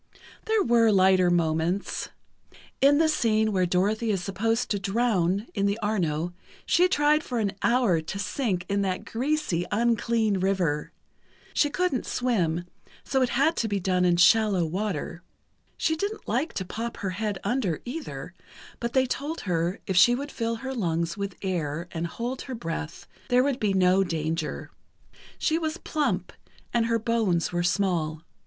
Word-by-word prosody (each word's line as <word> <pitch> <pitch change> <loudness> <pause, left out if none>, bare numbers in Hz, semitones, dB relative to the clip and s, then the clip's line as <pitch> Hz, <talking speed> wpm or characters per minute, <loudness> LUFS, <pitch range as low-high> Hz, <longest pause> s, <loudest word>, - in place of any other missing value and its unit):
There 440 -1 +2
were 235 -1 +4
lighter 185 -2 +4
moments: 170 +2 0 0.7
In 280 +1 +6
the 320 +1 +4
scene 220 -7 +2
where 185 -3 +1
Dorothy 205 +6 +1
is 195 -4 0
supposed 225 +5 -1
to 205 - +1
drown 200 -2 +1
in 200 -1 +1
the 200 +1 0
Arno, 175 -7 -1 0.3
she 360 +2 +4
tried 300 -2 +3
for 250 - -4
an 210 -3 0
hour 235 -9 +3
to 160 +5 -6
sink 200 -3 -2
in 200 0 0
that 185 -2 -2
greasy, 260 - -1
unclean 225 -2 +1
river. 180 -6 0 0.6
She 290 - +3
couldn't 360 -4 -1
swim, 175 -9 0 0.4
so 265 -1 0
it 255 - +2
had 280 +7 +2
to 225 - 0
be 205 -2 -1
done 180 0 +1
in 175 -1 +3
shallow 195 0 +4
water. 180 -1 -3 0.6
She 320 - +1
didn't 410 +6 -4
like 255 +9 -1
to 190 - -3
pop 230 +5 -5
her 195 -3 -3
head 205 +1 -2
under, 220 - 0
either, 290 +6 -6 0.5
but 235 0 -3
they 260 -1 +4
told 290 +5 -3
her 175 +1 -1
if 190 - -2
she 240 +8 +6
would 285 +3 -5
fill 230 -1 -2
her 265 +3 -5
lungs 170 -7 -1
with 200 -2 -4
air 170 -3 -2
and 170 0 -3
hold 240 +8 -4
her 260 - -6
breath, 165 -5 -5 0.2
there 250 0 +4
would 275 -2 0
be 210 -2 +1
no 185 +1 +4
danger. 160 -2 -3 0.7
She 320 0 +1
was 315 0 -2
plump, 305 -4 -2 0.4
and 230 -1 +2
her 230 0 +2
bones 220 -7 0
were 175 - +1
small. 175 -4 0
205 Hz, 165 wpm, -26 LUFS, 180-245 Hz, 0.7 s, In